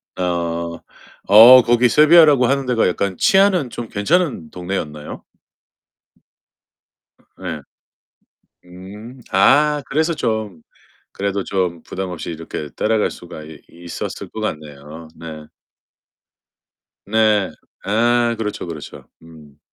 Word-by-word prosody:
아. 85 -2 -3 0.5
어, 115 +5 +9
거기 120 +1 +3
세비야라고 150 -3 +5
하는 135 +1 0
데가 125 -3 +1
약간 95 +1 -2
치안은 190 -8 +3
좀 115 -1 -7
괜찮은 125 - -1
동네였나요? 85 -5 -6 2.2
예. - - -5 1.1
음. 100 +8 -12
아, 145 +9 +3
그래서 160 +4 0
좀 110 - -3 0.5
그래도 100 0 -3
좀 90 -4 -2
부담 95 0 -6
없이 90 -1 -7
이렇게 80 -2 -7
따라갈 110 0 0
수가 80 - -11
이 80 0 -12
있었을 85 0 -8
것 - - -8
같네요. 75 +1 -7
네. 80 -2 -10 1.6
네. 105 -2 +2 0.3
아 120 +3 +1
그렇죠, 105 -3 -4
그렇죠. 80 -3 -9 0.2
음. 75 -3 -17
100 Hz, 205 characters per minute, -19 LUFS, 85-120 Hz, 2.2 s, 어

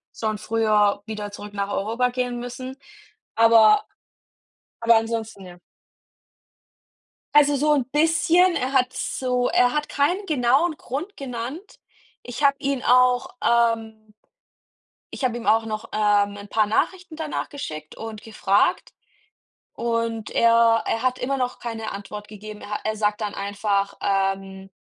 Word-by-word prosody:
schon 215 -1 -2
früher 210 -2 +1
wieder 210 -2 -6
zurück 205 0 -9
nach 200 -1 -2
Europa 230 +6 0
gehen 245 -1 -3
müssen, 255 +2 -7 0.6
aber 230 - +6 1.0
aber 230 0 +5
ansonsten, 225 -2 -3
ja. 180 -1 -13 1.8
Also 290 -1 +5
so 300 +2 +2
'n 275 -5 +1
bisschen. 325 +5 +3
Er 255 +1 -1
hat 255 -1 +2
so 255 -1 -1
er 245 0 +3
hat 300 0 -1
keinen 355 +8 0
genauen 295 +3 +2
Grund 305 +12 -6
genannt. 265 - -7 0.4
Ich 245 +4 -5
habe 280 0 +5
ihn 275 -2 -1
auch, 250 0 +3
ähm 225 -2 0 1.0
ich - - -5
habe 240 -2 -2
ihm 235 - -7
auch 225 +2 +3
noch, 215 -1 -5
ähm, 205 -1 +2
'n 200 0 -10
paar 215 +1 +2
Nachrichten 350 - -1
danach 310 -2 -4
geschickt 155 - -7
und 220 -1 -8
gefragt 205 -2 0 0.8
und 230 -1 -2
er 230 -1 +4
er 225 - -1
hat 255 0 0
immer 275 +2 -1
noch 250 -1 -2
keine 225 -2 -5
Antwort 210 +1 -8
gegeben. 210 0 -10
Er - - -10
ha 210 - -3
er 215 0 -1
sagt 210 0 0
dann 210 -1 -3
einfach, 200 0 -1
ähm, 195 0 -2
230 Hz, 145 wpm, -23 LUFS, 210-260 Hz, 1.8 s, aber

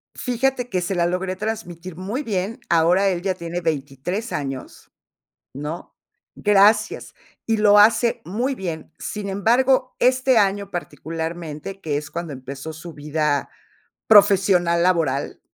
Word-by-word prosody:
Fíjate 250 0 -1
que 185 -4 -1
se 180 +2 -2
la 170 -1 +2
logré 185 +2 -2
transmitir 185 -5 -5
muy 205 - -4
bien, 210 +2 -3
ahora 175 +4 +4
él 175 -2 -2
ya 185 0 -1
tiene 170 0 -5
23 160 - -3
años, 135 -3 -6 0.6
¿no? 150 +5 -7 0.4
Gracias, 210 +1 +3 0.3
y 225 -1 +1
lo 210 -1 +5
hace 225 +3 +4
muy 240 - -2
bien. 170 -8 -6
Sin 210 -1 -5
embargo, 255 +6 +2
este 255 0 +3
año 200 -1 +1
particularmente, 165 +1 -5
que 145 -2 -1
es 145 - -6
cuando 170 -3 -5
empezó 135 +4 -7
su 165 +1 -10
vida 150 -1 -1 0.6
profesional 190 -5 +5
laboral. 160 -6 0
185 Hz, 130 wpm, -22 LUFS, 160-210 Hz, 0.6 s, lo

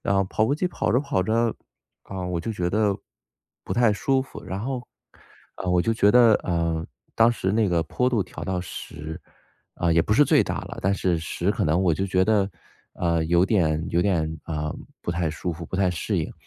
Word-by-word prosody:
然 100 - 0
后 95 - +3
跑 110 +3 0
步 140 - +1
机 180 +5 0
跑 145 - -1
着 125 - +4
跑 140 -9 0
着， 115 +3 +1 0.5
啊， 95 -2 -5
我 90 -2 -2
就 115 - -4
觉 90 -5 -2
得， 105 -1 +2 0.7
不 - - -3
太 120 -2 +4
舒 130 +6 +1
服。 130 - -11
然 95 - -5
后 125 +3 -4 0.7
呃， 95 - -3
我 90 -1 +3
就 115 +6 +1
觉 105 -2 +4
得， 120 -3 +7
呃， 85 -2 -1 0.3
当 115 +1 +5
时 95 -5 -1
那 110 +1 +2
个 85 -3 +1
坡 125 +9 0
度 120 -5 +1
调 90 - -8
到 95 -2 -1
10， 80 -3 -7 0.5
啊， 85 - 0
也 85 - +4
不 105 - 0
是 145 +7 +6
最 - - +4
大 - - -3
了。 - - -9
但 95 +1 +1
是 90 -3 0
10 80 - -2
可 - - 0
能 80 +4 +2
我 90 -3 +3
就 95 +5 -1
觉 95 0 +2
得， 105 -3 +2 0.5
呃， 85 -2 0
有 85 +2 +3
点 80 -6 +1
有 85 - +2
点 80 -4 0
啊 75 -1 -3 0.3
不 - - -2
太 85 -1 0
舒 80 +3 -3
服、 85 0 -8
不 - - -8
太 95 -1 +2
适 85 - -2
应。 - - -3
95 Hz, 230 characters per minute, -24 LUFS, 85-110 Hz, 0.7 s, 得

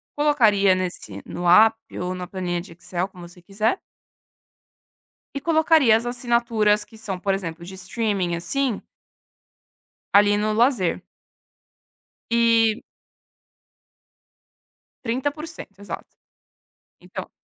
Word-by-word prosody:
colocaria 220 -10 +4
nesse 175 - -5
no 175 0 -4
app 220 +5 +7 0.2
ou 180 +1 -2
na 180 -1 -6
planilha 180 -2 -3
de 170 0 -10
Excel, 175 +2 -4
como 180 -3 -12
você 175 +1 -17
quiser. 210 - -1 1.6
E 280 - -3
colocaria 315 -5 +4
as 230 +2 -3
assinaturas 235 -4 +1
que 220 - -17
são, 200 -4 -5
por 195 +1 0
exemplo, 170 -3 -5
de 185 +2 -9
streaming 190 -1 -2
assim 240 +7 -1 1.3
ali 205 0 +5
no 215 +1 0
lazer. 230 -5 +2 1.3
E 230 -1 +3 2.2
30%, 275 - -4
exato. 200 - -8 0.8
Então - - -8
210 Hz, 105 wpm, -23 LUFS, 185-235 Hz, 2.2 s, app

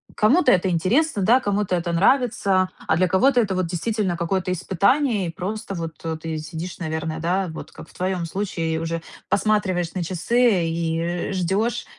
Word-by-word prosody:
кому-то 255 +6 +4
это 185 0 +3
интересно, 205 - +1
да, 240 +7 +5
кому-то 205 -4 0
это 170 -1 -2
нравится, 200 -2 +2 0.2
а 160 - +3
для 185 +1 +3
кого-то 245 +8 +3
это 200 -4 +1
вот 185 -2 0
действительно 185 +1 -1
какое-то 185 +1 -1
испытание. 200 - +1
И - - -4
просто 200 +4 -5
вот 165 -2 -5 0.3
ты 160 -1 -3
сидишь, 160 +3 -7
наверное, 160 -1 -3
да, 180 +4 0
вот 160 - -9
как - - -12
в - - -19
твоём 185 -1 -2
случае, 165 -2 -2
и - - -1
уже 165 0 -3 0.3
посматриваешь 190 -5 +1
на 185 -3 -2
часы 190 +2 +2
и 165 +2 -2
ждёшь, 195 +6 0
185 Hz, 170 wpm, -23 LUFS, 170-210 Hz, 0.3 s, да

